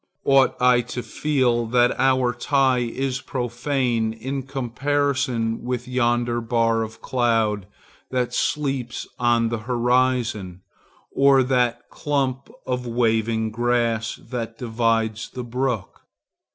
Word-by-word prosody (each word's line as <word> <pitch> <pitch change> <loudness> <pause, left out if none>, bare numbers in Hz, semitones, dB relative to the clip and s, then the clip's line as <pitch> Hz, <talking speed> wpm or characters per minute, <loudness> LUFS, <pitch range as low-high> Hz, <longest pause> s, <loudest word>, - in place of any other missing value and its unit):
Ought 135 -1 +4
I 125 -1 +5
to 125 +1 -6
feel 125 -6 0
that 120 +1 +3
our 130 -2 +3
tie 130 0 +2
is 130 +2 -2
profane 120 -3 -1
in 135 +5 -4
comparison 130 -2 -1
with 125 0 -3
yonder 120 -1 +1
bar 115 -1 +1
of 110 0 -7
cloud 115 -5 +1 0.4
that 125 -1 -1
sleeps 135 -5 -1
on 120 -1 +2
the 115 -1 -2
horizon, 120 -6 +1 0.5
or 135 -1 +5
that 125 -2 0
clump 135 -2 -2 0.2
of 125 -1 -2
waving 115 -1 +1
grass 115 -1 0
that 115 -2 -5
divides 115 -2 0
the 125 - -6
brook? 120 -3 -3
120 Hz, 110 wpm, -23 LUFS, 115-130 Hz, 0.5 s, I